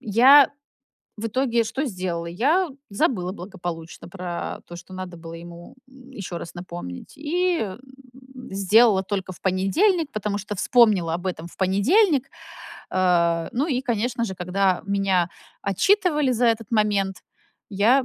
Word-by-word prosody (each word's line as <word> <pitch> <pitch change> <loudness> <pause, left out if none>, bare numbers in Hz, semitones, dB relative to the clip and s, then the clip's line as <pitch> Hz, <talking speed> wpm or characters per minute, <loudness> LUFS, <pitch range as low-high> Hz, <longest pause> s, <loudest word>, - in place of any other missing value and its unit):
я 255 +7 +6 0.7
в 225 +1 -4
итоге 235 0 +1
что 270 +6 -2
сделала? 180 -7 -3
Я 295 - +1 0.2
забыла 185 -3 0
благополучно 175 -4 -7
про 180 -2 -5
то, 175 - -9
что 180 +2 -13
надо 185 -2 -7
было 165 0 -9
ему, 170 +6 -11
м, 265 0 -16
еще 190 -7 -6
раз 170 - -9
напомнить 175 - -8
и, 345 +4 0
м, 195 -2 -4 0.7
сделала 200 +1 +4
только 190 -2 -3
в - - -15
понедельник, 290 - +1
потому 210 -1 -2
что 205 0 -6
вспомнила 205 -7 +3
об 175 +2 -4
этом 170 -3 -4
в 175 - -14
понедельник. 275 - +3 0.6
Э, 170 -3 +2
ну 275 +6 0
и, 255 -3 0
конечно 240 -1 -1
же, 190 -4 -4
когда 185 +1 0
меня 195 -3 +1 0.3
отчитывали 300 - +2
за 240 0 +2
этот 225 -2 0
момент 200 -3 +1 0.5
я 230 +7 +3
200 Hz, 145 wpm, -23 LUFS, 180-250 Hz, 0.7 s, я